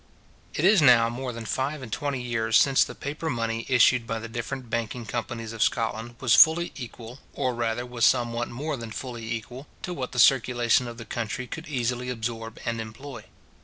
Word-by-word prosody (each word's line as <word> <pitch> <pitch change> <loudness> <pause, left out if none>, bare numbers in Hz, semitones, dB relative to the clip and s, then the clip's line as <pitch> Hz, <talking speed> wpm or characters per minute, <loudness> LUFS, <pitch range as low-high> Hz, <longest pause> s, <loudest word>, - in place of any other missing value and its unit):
It 155 - +1
is 195 -2 +6
now 120 -5 +6
more 125 +1 -4
than 115 -1 -7
five 135 +5 -2
and 115 - -9
twenty 140 +3 -2
years 115 -2 +1
since 135 +1 +5
the - - -7
paper 150 +3 -4
money 115 -2 -2
issued 125 -1 +4
by 115 - -2
the 115 +1 -6
different 120 +2 -5
banking 115 +1 -3
companies 115 0 -4
of 115 - -6
Scotland 115 0 0
was 130 -4 +2
fully 170 +2 +6
equal, 120 0 -9
or 130 - -1
rather 120 0 -2
was 125 -1 -4
somewhat 120 -1 +2
more 145 +5 -3
than 115 -3 -7
fully 115 0 -6
equal, 125 +5 -6 0.2
to 180 - -3
what 130 -6 -4
the - - -8
circulation 120 -1 +4
of 120 -1 -8
the 115 - -8
country 120 +3 -4
could 165 +6 -8
easily 125 -2 -2
absorb 115 -2 -4
and 115 -1 -1
employ. 115 +1 -9
120 Hz, 195 wpm, -26 LUFS, 115-130 Hz, 0.2 s, is